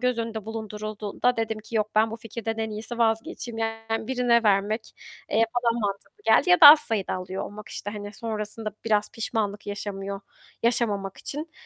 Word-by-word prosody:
göz 250 -1 +1
önünde 225 -2 -3
bulundurulduğunda 215 +1 -2
dedim 225 -1 -1
ki 220 +2 -6
"Yok, 215 0 +1
ben 220 +1 +4
bu 225 - -5
fikirden 225 0 -5
en 220 -1 -2
iyisi 225 +3 -5
vazgeçeyim." 225 0 -1
Yani, 225 0 -2
birine 245 -2 +3
vermek, 210 +2 +1 0.4
eee, 225 +1 +4 0.2
daha 235 0 +2
mantıklı 205 - -4
geldi. 360 - +4
Ya 360 - +6
da 310 - +12
az 300 +1 +11
sayıda 220 -8 -1
alıyor 185 +1 -4
olmak, 210 0 -9
işte, 205 - -5
hani, 205 -1 -7
sonrasında 215 0 -4
biraz 210 -2 +1
pişmanlık 215 -3 -3
yaşamıyor 200 -1 -5 0.4
yaşamamak 210 -5 0
için. 305 +3 -6
220 Hz, 170 wpm, -26 LUFS, 205-230 Hz, 0.4 s, da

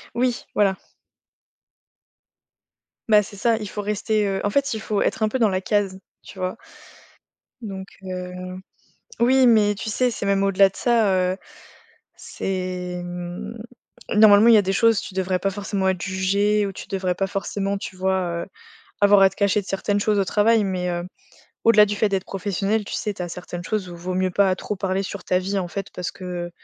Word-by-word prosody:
Oui, 245 0 0
voilà. 195 -2 +2 2.3
Bah, 210 -1 +7
c'est 205 - -10
ça, 230 +3 +2
il 210 -2 -6
faut 205 +1 -5
rester, 210 +1 0
heu, 195 -1 -1
en 205 - +1
fait, 280 +2 +1
il 220 - -3
faut 210 -2 -1
être - - -1
un 215 - +2
peu 260 - -1
dans 225 -4 +3
la 185 0 -1
case, 195 -2 0 0.2
tu 195 - -12
vois? 185 0 -3 1.0
Donc 195 -3 -7 0.2
heu, 180 -1 -5 0.9
oui, 255 +2 +5
mais 210 -3 +4
tu 215 - -5
sais, 250 +3 +1
c'est 210 - -4
même 195 0 +2
au-delà 195 0 +5
de - - -18
ça, 230 -5 +2 0.2
heu, 185 - -5 0.8
c'est, 180 -1 -4
mmh, 175 +5 -6 0.6
normalement, 210 +1 +7
il 235 - +8
y - - +8
a 210 - +5
des 195 0 -1
choses, 230 -1 +3
tu 200 - -9
devrais 185 -1 0
pas 195 - 0
forcément 195 -1 -1
être 185 -2 -2
jugé 200 +2 +1
ou 195 - -4
tu - - -10
devrais 185 -2 -1
pas 195 +1 -1
forcément, 195 0 -2
tu 195 - -7
vois? 190 +1 0 0.2
Heu, - - -10 0.5
avoir 205 0 +6
à 195 - +8
te - - -18
cacher 200 0 +2
de 190 - -13
certaines 200 +1 -1
choses 210 0 +1
au 195 - +2
travail, 215 +3 +3
mais 185 -2 -2
heu, 175 0 -3 0.6
au-delà 215 -2 +7
du 210 - -2
fait 210 0 +1
d'être 195 -1 -1
professionnel, 200 +2 -1
tu - - -6
sais, 210 - -2
tu 180 - -6
as 175 - -4
certaines 175 0 -7
choses 205 -2 -2
où 175 - -8
vaut 180 +2 -4
mieux 185 0 +1
pas 195 0 +3
trop 210 - -4
parler 190 0 -1
sur 195 0 -7
ta 180 - +2
vie, 195 +2 -2
en 180 - -3
fait 195 +2 -5
parce 180 - -3
que 180 -2 -6
195 Hz, 205 wpm, -23 LUFS, 185-210 Hz, 2.3 s, il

